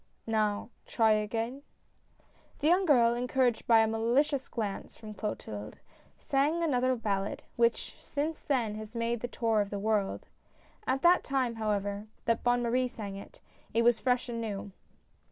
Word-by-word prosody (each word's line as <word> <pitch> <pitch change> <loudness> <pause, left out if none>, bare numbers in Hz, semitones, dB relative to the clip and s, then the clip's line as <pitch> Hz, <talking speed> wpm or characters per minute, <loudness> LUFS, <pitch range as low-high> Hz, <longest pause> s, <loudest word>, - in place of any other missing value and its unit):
" - - -41
Now, 215 0 0 0.2
try 225 -2 +3
again? 225 +5 -1 0.5
" - - -34
The 290 - -3
young 365 +3 +4
girl, 240 -5 +5
encouraged 245 0 0
by 225 -1 +7
a 220 - +3
malicious 255 +6 +1
glance 210 -4 -4
from 215 -1 -9
Clotilde, 110 - -5 0.4
sang 295 +5 +1
another 255 -4 +2
ballad, 200 -4 -2
which, 235 0 +1
since 305 +2 -3
then, 240 -7 0
has 215 +1 -8
made 235 0 -1
the 245 - -3
tour 225 -3 +1
of 200 - -3
the 205 - -4
world. 205 -1 0 0.6
At 270 +1 0
the 350 +1 +7
time, 255 -4 -1
however, 205 -1 -2 0.2
that 230 0 +1
Bonne 245 0 +2
Marie 250 +2 +1
sang 210 -5 -7
it, 200 - -11 0.3
it 230 - +4
was 240 -1 +4
fresh 250 0 +1
and 230 -1 -4
new. 205 -2 -4
230 Hz, 165 wpm, -30 LUFS, 215-255 Hz, 0.6 s, by